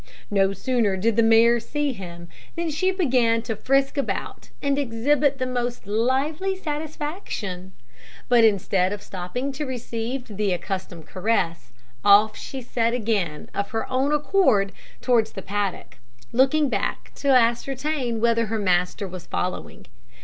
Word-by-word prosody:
No 195 -1 +3
sooner 220 -2 0
did 220 +3 +1
the 230 - +4
mare 230 +1 +5
see 295 +3 -2
him 175 -4 -9 0.3
than 335 -1 -2
she 370 +6 +1
began 250 - +2
to 225 - -3
frisk 275 +5 +1
about 275 - -4
and 280 0 0
exhibit 275 +3 +1
the 255 - -1
most 245 -2 -3
lively 270 - 0
satisfaction; 295 - -5 0.5
but 240 -2 +5
instead 195 -3 +2
of 205 - -7
stopping 195 +9 -4
to 280 +3 -4
receive 245 -1 -4
the 205 -3 +1
accustomed 180 -2 -5
caress, 180 - -1 0.3
off 210 +1 +6
she 265 -2 -7
set 235 0 0
again 205 -10 -2
of 200 0 -2
her 225 0 -3
own 265 +3 +1
accord 290 - +3 0.3
towards 235 -3 +2
the 195 - -7
paddock, 200 -8 -3 0.3
looking 270 +5 +3
back - - -2
to 280 - -4
ascertain 255 +1 +2
whether 230 0 +2
her 225 +2 -1
master 185 0 +1
was 185 -2 -9
following. 180 - -4
230 Hz, 140 wpm, -24 LUFS, 200-270 Hz, 0.5 s, off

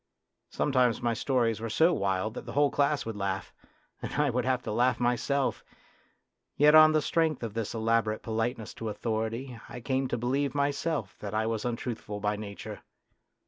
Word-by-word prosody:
Sometimes 125 -5 +2
my 120 -1 0
stories 115 -2 +1
were 115 - -3
so 165 +10 +4
wild 100 - 0
that - - -8
the - - -6
whole 145 0 +3
class 145 0 +1
would 115 -1 -4
laugh, 95 -2 -3 0.5
and - - -5
I 150 -2 +2
would 125 0 -1
have 130 -1 0
to 110 - -4
laugh 125 +4 +2
myself; 125 +3 0 0.9
yet 150 +1 +6
on 155 0 +9
the 155 -1 +2
strength 160 -5 +1
of 115 -3 -4
this 115 0 -3
elaborate 110 -1 +1
politeness 115 0 -2
to 110 - -2
authority 115 +3 -3
I 125 - -7
came 130 +2 -1
to 120 - -2
believe 135 +5 -1
myself 140 -4 -1
that 105 0 -5
I 110 +1 +1
was 110 0 -2
untruthful 115 -3 -4
by 105 0 0
nature. 100 -1 -7
120 Hz, 180 wpm, -29 LUFS, 110-140 Hz, 0.9 s, on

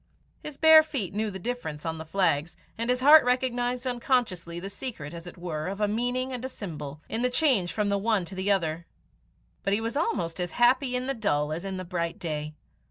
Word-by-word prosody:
His 300 -2 -8
bare 320 0 +8
feet 275 - -3
knew 215 +1 -1
the 190 - -6
difference 175 -8 -5
on 160 -1 -3
the 160 - -6
flags, 165 -3 0 0.2
and 230 +2 -3
his 250 0 +1
heart 300 +3 +9
recognized 250 0 0
unconsciously 235 -9 -1
the 190 - -6
secret 195 - -6
as 170 +1 -8
it 175 - -10
were 160 -3 -4
of 195 +2 -4
a 210 - +2
meaning 245 +4 -1
and 250 -1 -5
a 260 - -3
symbol, 155 - -7
in 225 - -2
the 250 - +2
change 250 - +2
from 210 -2 0
the 200 0 +1
one 210 -3 +1
to 195 - -9
the 190 +1 -2
other, 170 -4 0 0.7
but 195 - 0
he 205 - +2
was 230 +3 -3
almost 185 - -1
as 175 -1 -3
happy 250 +2 +3
in 250 0 -1
the 275 - 0
dull 150 - 0
as 165 - -4
in 195 -1 -4
the 185 - -5
bright 170 -2 -3
day. 150 -2 -4
205 Hz, 225 wpm, -27 LUFS, 170-250 Hz, 0.7 s, heart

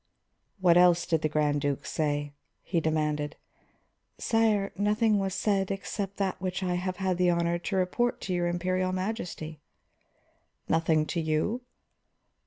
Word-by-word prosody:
"What 175 -2 +5
else 175 -1 +5
did 160 -2 +1
the 155 - +1
Grand 150 -1 +1
Duke 140 -2 -1
say?" 145 -2 -1 0.3
he 175 - 0
demanded. 150 -2 -1 0.8
"Sire, 220 -3 +2
nothing 210 +1 +2
was 195 -1 -1
said 195 -2 +1
except 195 0 -4
that 190 -2 -1
which 185 0 -2
I 180 -1 0
have 180 +1 -2
had 185 -1 0
the 180 0 +3
honor 170 0 +1
to 195 +3 -3
report 190 +6 +1
to 185 - -3
your 175 -1 +1
Imperial 185 +1 0
Majesty." 185 -6 -4 1.1
"Nothing 160 -1 +2
to 170 +1 -2
you?" 160 +10 0
180 Hz, 145 wpm, -28 LUFS, 160-195 Hz, 1.1 s, What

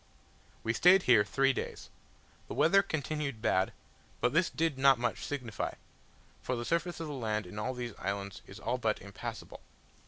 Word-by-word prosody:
We 115 - +1
stayed 180 +7 +6
here 115 -5 +6
three 135 +5 +2
days. - - -6 0.6
The - - -6
weather 195 +5 +5
continued 150 - -3
bad: 95 -4 +2 0.5
but 125 - +1
this 170 +2 +3
did 160 -4 -1
not 135 -1 +6
much 120 0 -2
signify, 125 -8 -3 0.7
for 125 - -2
the 120 0 -4
surface 170 +3 -1
of 165 - -3
the 150 - -5
land 110 -5 -2
in 105 +4 -7
all 130 +4 -2
these 120 -1 -4
islands 100 -1 -4
is - - -10
all - - -1
but - - 0
impassable. - - -8
130 Hz, 175 wpm, -31 LUFS, 115-155 Hz, 0.7 s, stayed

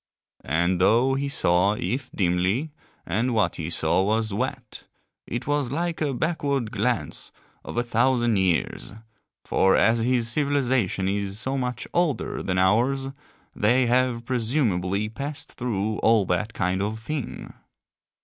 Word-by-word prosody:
And 85 +5 +1
though 120 +7 +4
he 140 +1 -1
saw 90 -5 +3
if 130 +4 -3
dimly, 95 - 0 0.3
and 115 +8 0
what 100 -6 +1
he 80 0 -4
saw 85 +1 +1
was 110 +1 0
wet, 125 +1 -4 0.4
it 120 +1 -4
was 145 -3 0
like 170 +2 -2
a 150 -2 +1
backward 140 -4 -1
glance - - -1 0.3
of - - -7
a 120 - +2
thousand 120 -1 +2
years, 95 0 0 0.5
for 95 0 +3
as 115 +1 +3
his 120 0 +1
civilization 130 -8 +1
is 100 0 -2
so 130 +3 -2
much 125 -2 -3
older 165 -8 0
than 90 -1 -2
ours 120 +9 +2 0.5
they 120 +5 +3
have 120 -1 +1
presumably 110 -6 0
passed 140 +7 -6
through 110 -3 -2
all 110 -3 +4
that 100 +6 -1
kind 95 0 0
of 105 +2 -2
thing. 145 +3 -5
115 Hz, 140 wpm, -25 LUFS, 100-130 Hz, 0.5 s, though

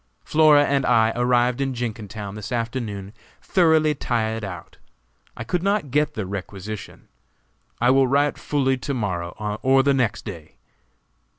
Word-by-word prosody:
Flora 150 -2 +5
and 140 -1 +1
I 110 -2 +3
arrived 120 +1 +2
in 135 -1 -1
Jenkintown 110 -4 -5
this 105 +2 -7
afternoon 115 -4 -4 0.3
thoroughly 160 -4 +3
tired 115 -5 -2
out. 95 -3 -8 0.6
I - - -5
could 175 +10 -1
not 195 -7 0
get 150 +2 +1
the 110 - -3
requisition. 100 +2 -7 0.7
I 120 +2 +4
will 135 0 +4
write 140 +2 +1
fully 135 -2 0
to 140 +2 -4
morrow 90 -7 -2 0.3
or 135 0 +4
the 140 0 +3
next 120 -5 -1
day. 85 -8 -9
120 Hz, 140 wpm, -23 LUFS, 105-140 Hz, 0.7 s, Flora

